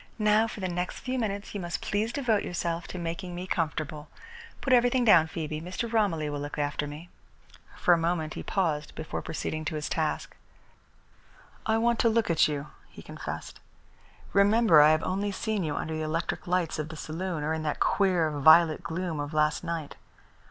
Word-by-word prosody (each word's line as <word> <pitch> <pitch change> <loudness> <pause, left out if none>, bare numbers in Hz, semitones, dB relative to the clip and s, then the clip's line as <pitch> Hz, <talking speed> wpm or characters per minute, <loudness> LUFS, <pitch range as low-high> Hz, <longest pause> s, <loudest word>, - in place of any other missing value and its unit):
"Now 215 0 +3
for 215 - -8
the 185 - -1
next 180 0 -3
few 255 0 -2
minutes 200 -3 -3
you 205 - -3
must 175 -1 -4
please 215 +3 -1
devote 235 -6 +1
yourself 170 0 -3
to - - -7
making 175 +1 -4
me 180 +1 -5
comfortable. 155 -4 -2 0.5
Put 265 - +1
everything 245 0 +4
down, 170 -7 +6
Phoebe. 155 -1 -4
Mr. 185 +7 -4
Romilly 180 -9 +1
will 145 -1 -3
look 145 +2 -6
after 145 0 -1
me." 150 +4 -9 0.7
For 175 - +4
a 170 - +3
moment 165 -2 -1
he - - -6
paused 155 -6 -1
before 155 - -5
proceeding 155 0 -4
to 155 - -2
his 150 0 -3
task. 155 -2 -2 1.3
"I 220 0 +3
want 235 0 +2
to 230 - +4
look 225 -4 +1
at 165 - +4
you," 150 -1 -4 0.2
he - - -13
confessed. - - -7 0.7
"Remember 200 -4 +6
I 150 - +7
have 155 0 +3
only 200 +2 -1
seen 210 0 -2
you 150 -2 -2
under 160 - -3
the 155 - -3
electric 160 +3 -2
lights 175 -3 0
of 155 0 -3
the 160 - -7
saloon, 165 +1 -4
or 155 +2 0
in 160 - -2
that 150 -1 -2
queer, 180 -5 +2
violet 155 +2 +6
gloom 165 -1 -3
of 145 +2 -4
last 150 +1 +2
night. 165 -3 -4
170 Hz, 190 wpm, -28 LUFS, 155-200 Hz, 1.3 s, I